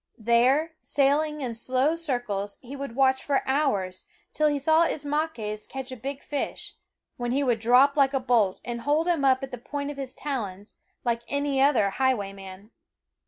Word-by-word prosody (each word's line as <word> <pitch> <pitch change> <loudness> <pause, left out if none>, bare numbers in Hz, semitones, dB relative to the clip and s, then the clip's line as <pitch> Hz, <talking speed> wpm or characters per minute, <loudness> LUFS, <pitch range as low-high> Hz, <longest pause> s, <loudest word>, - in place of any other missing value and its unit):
There, 250 +8 +3
sailing 295 +2 +1
in 245 -3 -3
slow 255 +6 +1
circles, 245 -11 -3
he 260 +3 -8
would 275 -4 -6
watch 265 0 +3
for 280 -2 +1
hours 205 -10 0 0.3
till 305 - +2
he 290 -1 +1
saw 315 +4 +4
Ismaques 285 -9 -3
catch 265 -1 -6
a - - -5
big 270 +4 -6
fish, 290 - -4 0.4
when 240 -1 -2
he 280 +2 +1
would 240 -4 +1
drop 250 +5 +5
like 275 -1 +3
a - - +2
bolt 235 -7 +1
and 240 -1 -4
hold 300 +6 +1
him 335 -5 +1
up 265 0 +3
at 270 - -5
the 250 - -6
point 285 +3 -4
of 290 - -10
his 270 -2 -6
talons, 210 -8 -5 0.3
like 235 -1 0
any 285 -1 0
other 245 -8 +4
highway 240 -5 0
man. 195 +2 -11
265 Hz, 180 wpm, -26 LUFS, 235-285 Hz, 0.4 s, drop